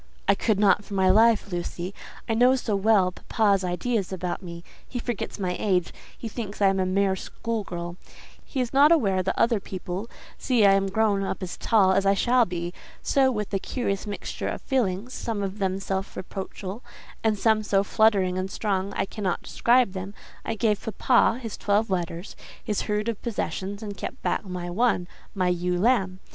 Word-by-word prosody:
I 200 - +6
could 205 0 0
not 205 0 +4
for 205 - -7
my 190 -1 +4
life, 220 0 +4
Lucy. 175 +1 -4 0.3
I 225 - 0
know 250 +3 +5
so 230 -5 -1
well 195 -2 +3
papa's 200 0 +1
ideas 195 +3 -1
about 180 -1 -3
me: 170 -2 -8 0.2
he 250 - -5
forgets 240 -3 -4
my 180 -3 -2
age; 180 -5 +1 0.2
he 230 - -6
thinks 215 -2 -6
I 200 -1 +5
am 195 0 0
a 185 - +1
mere 195 0 +2
school 225 +3 -4
girl; 175 -1 -6 0.5
he 270 - -5
is 245 0 -3
not 285 +3 +6
aware 200 - +3
that 185 - -2
other 230 -2 +3
people 190 +2 -6 0.3
see 240 -5 +3
I 195 - +7
am 195 0 +2
grown 205 -1 +2
up 195 0 -3
as 180 - -5
tall 205 -5 +3
as 195 +1 +2
I 195 - +4
shall 245 +4 +3
be; 175 -1 -4 0.3
so, 265 -1 +3
with 210 -4 -4
a 195 - +1
curious 200 -3 -3
mixture 205 - -4
of - - -4
feelings, 240 -3 -1
some 220 -3 -3
of 195 +2 -4
them 190 -1 0
self 195 0 -3
reproachful, 190 +3 -6 0.4
and 220 -2 +2
some 220 +1 +3
so 200 -2 +2
fluttering 195 -3 +2
and 185 +1 -3
strong, 195 -1 -2
I - - 0
cannot 195 -2 -3
describe 240 -4 +3
them, 190 +1 -6 0.3
I 225 - -2
gave 210 -1 +1 0.2
papa 240 -2 +4
his 230 -4 -6
twelve 205 +1 +1
letters—his 180 +3 -4
herd 210 +1 -1
of 230 -3 -3
possessions—and 205 -2 -4
kept - - -6
back - - 0
my 180 -2 -5
one, 180 -1 +1 0.3
my 185 -2 +1
ewe 180 0 0
lamb. 195 -4 +2
200 Hz, 190 wpm, -25 LUFS, 185-225 Hz, 0.5 s, I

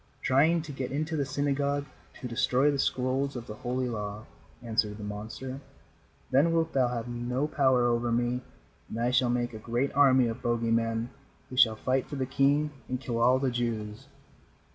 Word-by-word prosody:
"Trying 155 +5 +3
to 155 - -7
get 135 -2 -4
into 155 +3 -2
the 140 -3 -1
synagogue 145 0 0 0.3
to 125 - -5
destroy 130 +3 +2
the 140 - -2
scrolls 135 +2 0
of 120 -2 -5
the 105 - -7
Holy 125 +3 -2
Law," 105 -2 -5 0.4
answered 110 -3 0
the 105 - -8
monster. 110 +6 -6 0.7
"Then 145 +6 +4
wilt 165 -1 +1
thou 130 -2 +3
have 120 -1 -3
no 120 +3 -2
power 130 -5 +3
over 120 0 +1
me, 120 +1 0 0.5
and 115 - -5
I 120 +1 +1
shall 125 -1 +3
make 120 0 0
a 110 - -7
great 120 +5 -1
army 130 -3 +5
of 115 - -4
bogey 115 -1 0
men 115 +1 0 0.4
who - - -6
shall 120 -4 +5
fight 130 +3 0
for 145 - -6
the 130 -1 -1
king 140 +3 +2 0.2
and 130 0 -2
kill 120 -3 -3
all 125 +2 +5
the 130 -1 0
Jews." 115 0 -3
125 Hz, 185 wpm, -29 LUFS, 115-135 Hz, 0.7 s, army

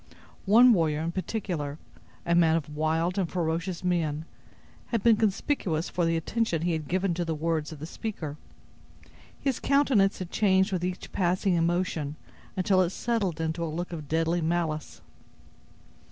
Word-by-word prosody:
One 235 +4 +7
warrior 155 -5 +1
in 165 +1 -2
particular, 170 -6 -3 0.5
a 170 - +1
man 165 -2 +5
of 150 -2 -3
wild 165 +5 0
and 180 -4 0
ferocious 170 +1 -2
mien, 160 -4 0 0.6
had 230 -4 -1
been 230 -2 +6
conspicuous 200 - 0
for 175 - 0
the 165 0 +1
attention 170 -1 -1
he 175 - +1
had 160 -3 -2
given 185 +2 0
to 175 +1 -1
the 165 -1 -2
words 160 -1 -1
of 155 - -8
the 150 - -7
speaker. 165 -5 -5 1.0
His 270 -4 -1
countenance 265 -8 +3
had 185 -2 -6
changed 190 -1 +3
with 180 -2 -1
each 180 0 -4
passing 185 +1 +1
emotion, 170 -3 0 0.4
until 185 0 +3
it 180 - +2
settled 200 -5 -1
into 165 +1 -2
a - - 0
look 170 +3 -4
of 155 -3 -6
deadly 165 +2 +1
malice. 160 -2 -2
175 Hz, 160 wpm, -27 LUFS, 160-190 Hz, 1.0 s, One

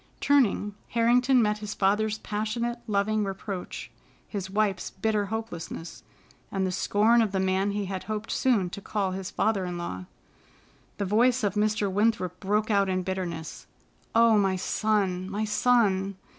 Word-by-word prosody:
Turning, 235 -7 +2
Harrington 245 +2 +3
met 210 0 0
his 210 -1 -5
father's 210 +2 +1
passionate, 235 +3 -3
loving 210 +1 +1
reproach, 195 -1 -5 0.4
his 195 -3 -5
wife's 200 -2 0
bitter 210 0 -1
hopelessness, 200 -6 -6 0.5
and 190 -1 0
the 185 - -1
scorn 215 +5 +3
of 220 -3 +1
the 195 - 0
man 190 +1 +1
he 205 0 -2
had 190 -1 -5
hoped 215 +1 -4
soon 230 -8 +2
to 200 - -7
call 195 -2 -1
his 190 0 -4
father 210 -4 0
in 180 -1 -4
law. 95 - -5 0.9
The 200 - -1
voice 240 +5 +3
of 200 -3 +1
Mr. 210 0 +1
Winthrop 195 -3 0
broke 210 +2 0
out 200 -1 +3
in 185 0 0
bitterness: 175 -4 -5 0.5
"Oh, 230 -2 +6
my 195 -2 +2
son, 190 -1 0
my 210 +2 -2
son!" 205 -4 +2
205 Hz, 155 wpm, -27 LUFS, 190-220 Hz, 0.9 s, Oh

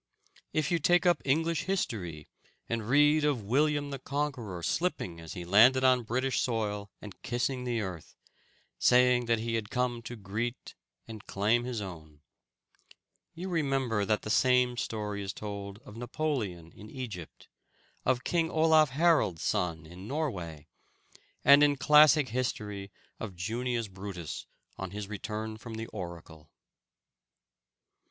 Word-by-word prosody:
If 155 0 0
you 170 - +2
take 175 +4 +3
up 175 -1 +4
English 160 +4 +1
history, 95 - -3 0.4
and 115 -1 -3
read 150 +3 +5
of 145 -7 +1
William 145 +5 +1
the 140 - -5
Conqueror 130 - -3
slipping 90 - -1
as 80 -1 -8
he 90 - -6
landed 120 +8 +6
on 130 -1 +5
British 125 +3 0
soil, 105 -4 -2
and 105 -3 -10
kissing 125 +1 -2
the 120 -2 -1
earth, 90 -5 -7 0.6
saying 125 -1 +4
he 115 0 0
had 110 -2 -2
come 125 -1 -1
to 120 +1 -7
greet 110 +4 -4 0.3
and 110 -2 -9
claim 110 +5 +1
his 125 -4 -3
own, 80 -6 -9 1.1
you 180 +3 -5
remember 135 - 0
that 105 +1 0
the 105 - -3
same 125 +1 +3
story 105 -3 -3
is 95 0 -4
told 100 -1 -6
of 105 - -11
Napoleon 115 - -3
in 105 - -13
Egypt, 110 - -8 0.6
of 130 0 +1
King 165 0 +1
Olaf 160 -1 +4
Harold's 150 - +2
son 80 -3 -1
in 90 +5 -11
Norway, 95 - -3 0.8
and 140 +2 +8
in 145 -1 +5
classic 150 0 +6
history 105 -5 -3 0.3
of 105 -5 -6
Junius 115 +5 -2
Brutus 95 -4 -7 0.3
on 95 - -4
his 100 +1 -6
return 110 +1 -5
from 115 0 -8
the 110 0 -4
oracle. 85 -5 -9
115 Hz, 140 wpm, -30 LUFS, 100-135 Hz, 1.1 s, and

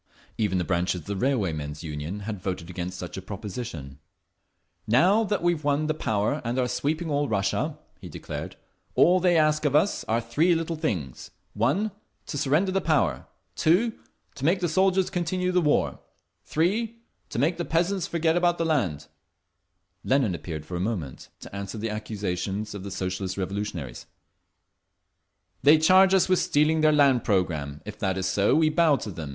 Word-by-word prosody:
Even 105 -4 0
the 90 - 0
branches 90 0 0
of - - -19
the 100 - -3
Railwaymen's 85 - -1
Union 80 +6 -5
had 105 -2 -5
voted 90 -3 -4
against 90 +1 -5
such 90 +1 -7
a - - -4
proposition…. 95 - -7 0.9
"Now 180 - +4
that 205 -3 -1
we've 175 -3 +1
won 145 +1 +1
the 155 - 0
power 110 0 -1
and 120 +2 -2
are 125 -1 +1
sweeping 150 +7 -2
all 145 0 +1
Russia," 100 -2 -1 0.2
he - - -9
declared, - - -7 0.4
"all 180 +2 +5
they 175 -1 +3
ask 155 -1 +3
of 145 -2 +1
us 175 +7 +2
are 115 +1 +1
three 150 +10 +2
little 165 0 -2
things: 90 - -3 0.2
1. 145 - +1 0.3
To 145 - -5
surrender 155 +9 +2
the 195 0 +1
power. 150 - +1 0.3
2. 200 +9 +3 0.4
To 140 - -10
make 175 +6 +3
the 175 - 0
soldiers 190 +2 +2
continue 180 0 -1
the 180 0 +3
war. 150 -3 +1 0.5
3. 210 +8 0 0.3
To - - -6
make 155 +8 +1
the 175 - -2
peasants 175 +3 0
forget 165 -1 +1
about 175 0 +2
the 165 - 0
land…." 95 - 0 1.0
Lenin 130 -7 +2
appeared 80 -3 -6
for 90 - -6
a - - -2
moment, 90 - -4
to - - -10
answer 100 +2 -5
the 110 +1 -3
accusations 105 -1 -3
of 100 - -6
the 100 - -6
Socialist 95 0 -3
Revolutionaries: 95 -9 -4 1.5
"They 150 +2 +7
charge 185 +4 +6
us 190 - +3
with 185 -1 +3
stealing 155 +2 +2
their 155 0 +5
land 140 -5 +4
programme…. 80 -8 -1
If 105 0 -8
that 95 -1 -1
is 95 - -2
so, 100 +2 +2
we 155 0 +4
bow 155 -1 +4
to 110 -5 -5
them. 80 -4 -6
125 Hz, 175 wpm, -26 LUFS, -, 1.5 s, They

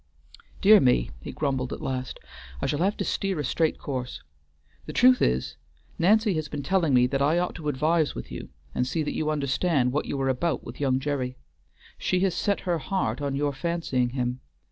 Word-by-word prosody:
"Dear 210 +1 +8
me!" 125 - +2
he - - -6
grumbled 135 -3 -2
at - - -4
last, 130 -1 -4 0.4
"I - - -2
shall 145 - 0
have 195 +4 +1
to - - -1
steer 195 -5 -1
a - - -1
straight 160 +4 +1
course. 130 -3 -5 0.6
The - - -5
truth 255 +1 +5
is, 65 +1 0 0.4
Nancy 210 +4 +4
has 155 -2 -3
been 145 -1 -4
telling 175 -1 +2
me 125 0 +5
that 135 +2 -1
I 150 +4 +3
ought 180 0 0
to 150 -3 -4
advise 155 +3 +1
with - - -7
you, - - -7 0.2
and 125 - 0
see 160 +4 -1
that 150 - -3
you 155 - -1
understand 140 -2 +1
what 150 +3 -1
you 140 - -3
are 135 - +1
about 130 +3 0
with - - -9
young 130 -2 +2
Gerry. 130 -3 -2 0.6
She 180 - +1
has 190 -2 +2
set 200 +3 0
her 175 -3 -1
heart 185 +1 -2
on 140 -1 -1
your 145 0 0
fancying 135 -4 -1
him. 125 0 -2
145 Hz, 205 wpm, -26 LUFS, 130-170 Hz, 0.6 s, Dear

